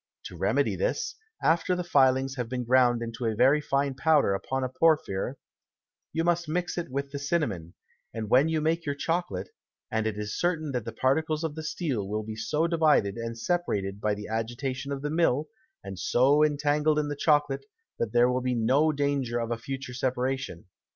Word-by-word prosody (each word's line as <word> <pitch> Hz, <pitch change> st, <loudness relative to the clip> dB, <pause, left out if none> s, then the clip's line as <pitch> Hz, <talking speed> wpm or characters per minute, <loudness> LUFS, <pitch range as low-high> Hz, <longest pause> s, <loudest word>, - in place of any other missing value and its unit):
To -, -, -8 dB
remedy -, -, +1 dB
this, -, -, -1 dB, 0.3 s
after 165 Hz, +3 st, +2 dB
the 180 Hz, -, -2 dB
Filings 135 Hz, -4 st, +3 dB
have 125 Hz, -3 st, -4 dB
been 125 Hz, 0 st, -2 dB
ground 120 Hz, -1 st, +3 dB
into 115 Hz, +1 st, -4 dB
a 110 Hz, -, 0 dB
very 135 Hz, +7 st, +4 dB
fine 140 Hz, -1 st, 0 dB
Powder 145 Hz, -5 st, +3 dB
upon 130 Hz, +7 st, -2 dB
a -, -, 0 dB
Porphyry; 130 Hz, -5 st, +1 dB, 0.8 s
you 165 Hz, -, -1 dB
must 170 Hz, -1 st, +1 dB
mix 175 Hz, +2 st, -1 dB
it 175 Hz, -5 st, -4 dB
with 140 Hz, +1 st, -3 dB
the 140 Hz, -, -4 dB
Cinnamon, 135 Hz, -, -2 dB, 0.4 s
when 125 Hz, +7 st, +2 dB
you 160 Hz, -1 st, 0 dB
make 165 Hz, +2 st, 0 dB
your 145 Hz, -2 st, -2 dB
Chocolate, 140 Hz, -, -2 dB, 0.4 s
and 110 Hz, 0 st, 0 dB
it 105 Hz, -1 st, -3 dB
is 105 Hz, 0 st, -4 dB
certain 160 Hz, -4 st, 0 dB
that 125 Hz, -4 st, -3 dB
the 115 Hz, -, -4 dB
Particles 155 Hz, +6 st, 0 dB
of 160 Hz, -2 st, -2 dB
the 160 Hz, -, -6 dB
Steel 145 Hz, -, -2 dB
will 105 Hz, +2 st, -2 dB
be 110 Hz, 0 st, -6 dB
so 150 Hz, +8 st, 0 dB
divided 155 Hz, -, +3 dB
and 115 Hz, 0 st, -5 dB
separated 105 Hz, -, -1 dB
by 105 Hz, -1 st, +1 dB
the 105 Hz, 0 st, -7 dB
Agitation 125 Hz, +5 st, -3 dB
of 140 Hz, 0 st, -4 dB
the 150 Hz, -, -2 dB
Mill, 155 Hz, -3 st, +1 dB, 0.3 s
and 95 Hz, -1 st, -7 dB
so 140 Hz, +5 st, +4 dB
entangled 150 Hz, +1 st, +2 dB
in 150 Hz, -1 st, +1 dB
the 145 Hz, -, -3 dB
Chocolate, 150 Hz, -, +1 dB, 0.3 s
that 115 Hz, -, -1 dB
there 120 Hz, +1 st, +5 dB
will 125 Hz, 0 st, 0 dB
be 125 Hz, 0 st, 0 dB
no 130 Hz, +7 st, +3 dB
danger 140 Hz, -4 st, -1 dB
of 115 Hz, 0 st, -3 dB
a -, -, +1 dB
future 135 Hz, +1 st, -6 dB
Separation. 130 Hz, -5 st, -2 dB
135 Hz, 190 wpm, -27 LUFS, 115-155 Hz, 0.8 s, there